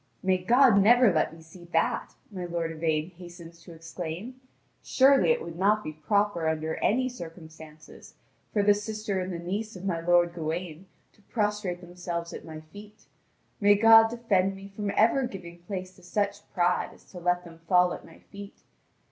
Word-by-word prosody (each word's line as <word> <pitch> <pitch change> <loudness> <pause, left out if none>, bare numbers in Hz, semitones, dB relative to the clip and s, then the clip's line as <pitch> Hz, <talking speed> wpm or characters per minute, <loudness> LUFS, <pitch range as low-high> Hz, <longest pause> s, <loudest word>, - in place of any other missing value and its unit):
"May 185 -1 +2
God 235 +3 +5
never 235 0 +5
let 155 - +1
me 165 0 -14
see 175 +2 -15
that!" - - 0 0.2
my 185 -3 -5
lord 170 -1 -3
Yvain 160 +1 -1
hastens 170 -1 -12
to 170 +1 -13
exclaim; 170 +9 -7 0.4
"surely 270 - +4
it 475 - +2
would 170 0 -8
not 210 +2 +2
be 155 - -6
proper 200 +1 0
under 160 0 -2
any 255 +4 +1
circumstances 160 -7 -11 0.4
for 205 - +1
the 205 0 +6
sister 210 -1 -3
and 185 +1 -4
the 175 - -4
niece 200 +6 -4
of 185 +1 -9
my 175 -4 -1
lord 175 0 +3
Gawain 170 +1 -5 0.3
to - - -27
prostrate 210 -4 -2
themselves 175 -1 -6
at - - -8
my 155 -1 -9
feet. 205 +6 -15 0.5
May 205 0 +5
God 225 +1 +7
defend 200 -5 0
me 195 +1 -11
from 205 -1 -3
ever 245 +4 +3
giving 175 -4 -10
place 185 +1 -7
to - - -18
such 200 +3 -3
pride 180 0 +1
as - - -21
to 180 - -9
let 180 0 0
them 165 -1 -13
fall 180 -1 +4
at - - -9
my - - -16
feet! 200 +1 -13
185 Hz, 180 wpm, -27 LUFS, 170-210 Hz, 0.5 s, God